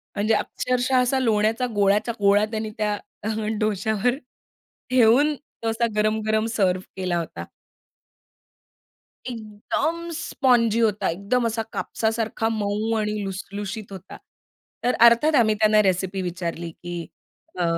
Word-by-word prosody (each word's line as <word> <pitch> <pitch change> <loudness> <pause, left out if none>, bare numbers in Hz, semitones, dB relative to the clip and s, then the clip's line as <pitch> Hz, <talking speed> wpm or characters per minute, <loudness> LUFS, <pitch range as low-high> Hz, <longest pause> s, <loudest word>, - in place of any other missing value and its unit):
म्हणजे 215 +2 +1
अक्षरशः 250 +4 0
असा 250 +2 +1
लोण्याचा 225 0 +1
गोळाच्या 205 +3 +2
गोळा 200 +1 +4
त्यांनी 220 -1 -3
त्या 210 -1 0 0.3
अ, 215 - -2 0.3
डोशावर 215 +3 0 0.7
ठेऊन 255 +4 +4 0.3
तो 225 - +1
असा 225 +1 +1
गरम-गरम 215 0 +1
सर्व्ह 185 -2 +1
केला 185 -2 -1
होता. 165 - -6 1.8
एकदम 250 +9 -3
स्पॉन्जी 245 -8 +2
होता. 215 -3 +1
एकदम 200 +8 0
असा 225 0 -2
कापसासारखा 225 0 -1
मऊ 215 +1 -1
आणि 210 -1 -2
लुसलुशीत 200 +2 -6
होता. 190 -3 -10 0.7
तर 250 - +2
अर्थात 290 +7 +4
आम्ही 220 -3 +4
त्यांना 215 0 +5
रेसिपी 190 0 0
विचारली 175 -1 -4
की 175 0 -7 0.5
अ, 175 - +2
215 Hz, 120 wpm, -24 LUFS, 200-235 Hz, 1.8 s, त्यांना